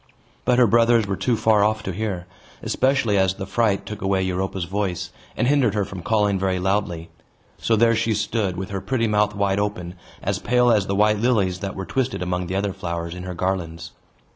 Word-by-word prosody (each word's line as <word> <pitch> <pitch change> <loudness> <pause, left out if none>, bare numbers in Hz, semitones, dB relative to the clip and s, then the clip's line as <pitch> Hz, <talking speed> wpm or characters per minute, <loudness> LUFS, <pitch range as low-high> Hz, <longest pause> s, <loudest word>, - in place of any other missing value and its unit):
But 125 - +3
her 125 - +6
brothers 115 0 +4
were 100 -1 -2
too 120 +4 0
far 110 -2 +3
off 110 +1 +1
to 95 - -3
hear; 95 -2 -3 0.4
especially 130 -6 +1
as 95 0 +2
the 95 - -5
fright 100 -1 0
took 105 +2 -7
away 95 -1 +1
Europa's 95 0 -2
voice, 95 0 -3 0.3
and 120 - +1
hindered 130 -7 +3
her 105 -2 +1
from 95 -1 -8
calling 105 0 +1
very 95 -1 0
loudly. 90 -3 -1 0.5
So 115 - +2
there 115 +1 +4
she 115 0 0
stood, 100 -3 -1
with 95 +2 -5
her 95 -1 -3
pretty 120 -1 0
mouth 105 0 +1
wide 100 -1 +1
open, 90 -4 -3 0.3
as - - -1
pale 125 0 +3
as 105 -4 +2
the 100 - -1
white 105 +1 +3
lilies 105 -6 +1
that 100 -1 -5
were 95 - -5
twisted 130 -5 -1
among 90 0 -2
the 95 - -3
other 100 0 -1
flowers 85 -1 -4
in 90 - -7
her 90 -1 -5
garlands. 85 -3 -3
100 Hz, 210 wpm, -22 LUFS, 95-110 Hz, 0.5 s, her